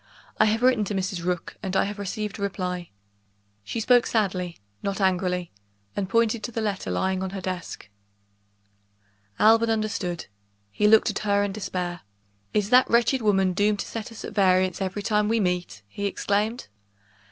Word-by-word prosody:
I - - +6
have 220 +2 +1
written 250 -4 +4
to 205 - -3
Mrs. 185 -2 -2
Rook, 180 -1 -3
and 190 -2 -3
I - - +4
have 205 +1 -5
received 210 +2 -4
a - - -6
reply." 180 -3 -3 0.7
She 230 - -4
spoke 245 +2 +4
sadly, 185 -6 -1 0.2
not 200 0 -2
angrily 180 -2 0 0.4
and 190 -2 -2
pointed 230 +1 +2
to 240 - -5
the 225 - -3
letter 205 -3 -2
lying 190 0 0
on 190 - -2
her 195 +1 -5
desk. 185 - -5 1.5
Alban 225 +1 +5
understood: 215 -6 -2 0.5
he 210 - +2
looked 220 +1 +5
at - - -3
her 205 -1 +2
in 205 - -1
despair. 180 -3 -4 0.5
"Is 210 0 0
that 250 +1 +6
wretched 240 +2 +3
woman 195 -3 +2
doomed 205 +2 +2
to - - -5
set 225 0 -6
us 225 - -8
at - - -7
variance 185 -2 +3
every 195 +2 -3
time 210 -1 +1
we 230 0 +2
meet!" 180 - -2
he 200 - -3
exclaimed. 210 +4 -1
200 Hz, 175 wpm, -25 LUFS, 185-215 Hz, 1.5 s, I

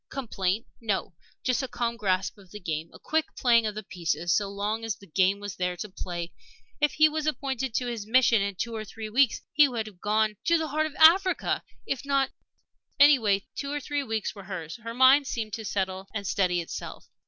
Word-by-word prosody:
Complaint? 215 -5 -2
No! 200 -5 -2 0.3
Just 255 +1 +1
a 265 - -3
calm 235 -1 -2
grasp 190 -3 0
of 190 -2 -17
the 210 - -9
game 160 -3 -4
a - - -13
quick 315 0 0
playing 235 -3 +4
of 210 - -4
the 215 - -5
pieces 170 -1 -1
so 200 +2 +1
long 205 +3 -2
as 225 -3 -2
the 200 - -16
game 190 +3 +2
was 205 -1 -6
there 180 -1 -1
to 210 - -6
play. 175 -2 -6 0.5
If 295 -1 +2
he 310 0 +6
was 310 0 -2
appointed 265 -4 -2
to 250 - +1
this 230 -4 -4
mission, 235 -2 +4
in 200 0 -2
two 230 +5 -3
or 215 - -4
three 215 0 -8
weeks 260 +1 +3
he 295 -1 +6
would 235 -4 -3
be 215 - -8
gone 210 +3 0
to 335 - +4
the 320 -1 -2
heart 310 +2 +1
of 305 - -11
Africa. 370 +4 +5 0.2
If 270 - -3
not 275 -1 +1 0.7
Anyway, 230 -9 +5
two 280 0 -4
or 295 - -1
three 290 0 -2
weeks 225 -5 -2
were 200 -2 -11
hers. 170 -5 -6
Her 230 0 -7
mind 265 +2 +6
seemed 220 -4 -3
to 220 - -4
settle 190 -2 -2
and 200 -1 -3
steady 180 -2 +1
itself. 165 - -7
220 Hz, 215 wpm, -27 LUFS, 195-265 Hz, 0.7 s, he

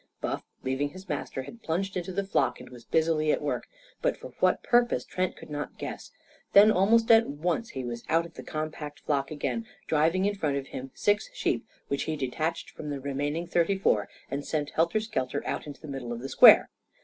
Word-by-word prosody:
Buff, - - -3 0.2
leaving 130 +2 0
his 185 +5 -12
master, 145 -4 -3
had 230 - -11
plunged 190 +4 -2
into 180 0 -3
the 200 +2 -1
flock 195 - +1
and - - -12
was 120 -2 -12
busily 160 -1 +2
at - - +1
work, - - -2 0.3
but - - +1
for - - -9
what - - +3
purpose 240 - +3
Trent 185 0 -2
could - - -12
not 145 0 -5
guess. - - -6 0.4
Then, 205 +2 +9
almost 225 +4 +4
at 225 0 +7
once, 170 +10 -1
he 130 -2 -5
was 120 -1 -5
out 165 +1 +3
of 170 - -12
the - - -8
compact 155 -1 -5
flock 140 -2 0
again, 220 +9 -3 0.2
driving 165 +5 +2
in 205 - +2
front 150 -8 -1
of 135 -1 -5
him 130 +1 -6
six 205 - +1
sheep, - - -1 0.2
which 140 - -1
he 155 - -1
detached 155 +4 -2
from 150 - -7
the 140 -1 -3
remaining 145 +4 -2
thirty 175 +3 +1
four, 105 - +2 0.2
and 140 +1 -2
sent 145 -1 -2
helter 170 +6 +2
skelter 145 - -2
out - - -3
into 145 - -8
the 155 - -10
middle 135 -4 -5
of 120 0 -4
the 135 - -5
square. - - +8
155 Hz, 210 wpm, -28 LUFS, 140-190 Hz, 0.4 s, Then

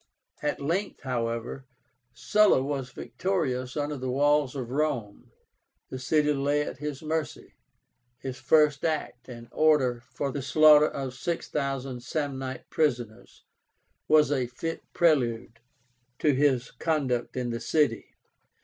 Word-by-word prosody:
At 150 - -1
length, 170 +8 -2
however, 120 0 -3 0.4
Sulla 130 - +3
was 135 -2 -3
victorious 130 -2 -2
under 145 0 -2
the 130 0 -4
walls 145 +1 +2
of 125 -3 -5
Rome. 130 -8 -2 0.6
The 130 - -5
city 150 +3 +2
lay 145 +1 +1
at 140 - -7
his 150 0 -5
mercy. 155 0 -3 0.6
His 130 -1 -6
first 150 +2 +3
act, 155 -6 -3
an 120 -1 -9
order 140 -6 +3
for 135 +3 -3
the 140 - -4
slaughter 150 +2 +6
of 135 -2 -5
6,000 135 -4 -3
Samnite 135 -1 -4
prisoners, 120 -8 -2 0.6
was 150 -2 +5
a 130 -4 0
fit 165 +7 -5
prelude 120 -9 +1 0.6
to 150 - +2
his 135 -2 +1
conduct 135 -7 -1
in 125 -1 -2
the 115 - -3
city. 150 +4 0
140 Hz, 125 wpm, -27 LUFS, 125-150 Hz, 0.6 s, slaughter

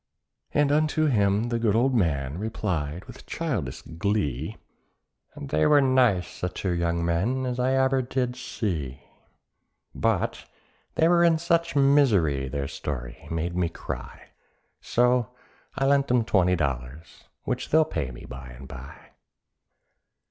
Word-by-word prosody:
And 145 -1 +2
unto 155 +1 +2
him 105 -4 +2
the 115 -1 -1
good 110 -3 +2
old 130 +4 +3
man 80 - 0
replied 90 -6 -3
with - - -13
childish 130 - -3
glee, 85 - -2 0.8
"They 75 +2 +1
were 150 - +6
as 140 - +5
nice 125 -8 +2
a 90 - 0
two 90 +1 -3
young 85 -1 0
men 105 +11 0
as 125 0 -3
I 130 +1 +2
did 130 -1 -2
ever 125 -1 +1
see; 80 - -4 0.9
But - - -1 0.5
they 160 - +4
were 170 0 +4
in 165 -1 +5
such 170 0 0
misery 110 - +3
their 70 +1 -3
story 65 -4 -6
made 85 +1 -2
me 90 -2 +1
cry; - - -8 0.5
So 125 0 +1 0.4
I 135 - +1
lent 140 0 +3
'em 125 -1 +3
twenty 90 -5 +3
dollars—which 75 - -5
they'll 160 +1 +5
pay 80 - -3
me - - -10
by 65 0 -9
and 60 +2 -11
bye. 65 +1 -11
100 Hz, 140 wpm, -26 LUFS, -, 0.9 s, were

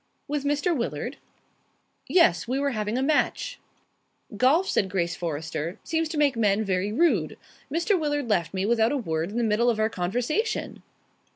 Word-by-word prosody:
"With 290 -1 -2
Mr. 290 +4 +1
Willard?" 235 -4 -3 0.9
"Yes. 335 - +4
We 255 +3 -1
were 280 0 0
having 215 0 -2
a 260 - 0
match." 310 - 0 0.8
"Golf," 285 - +3
said 195 - +1
Grace 170 -3 -1
Forrester, 160 +1 -4
"seems 325 -1 -1
to 315 - -4
make 290 -3 +3
men 210 -2 +2
very 195 0 -1
rude. 225 - +1 0.3
Mr. 345 +5 +1
Willard 290 -4 -1
left 175 -8 +1
me 190 0 -1
without 225 +1 +3
a 290 - 0
word 165 -7 -2
in 215 - -5
the 240 - +1
middle 225 +2 +2
of 225 -2 0
our 220 +1 +1
conversation." 245 - -2
235 Hz, 170 wpm, -26 LUFS, 195-290 Hz, 0.9 s, Yes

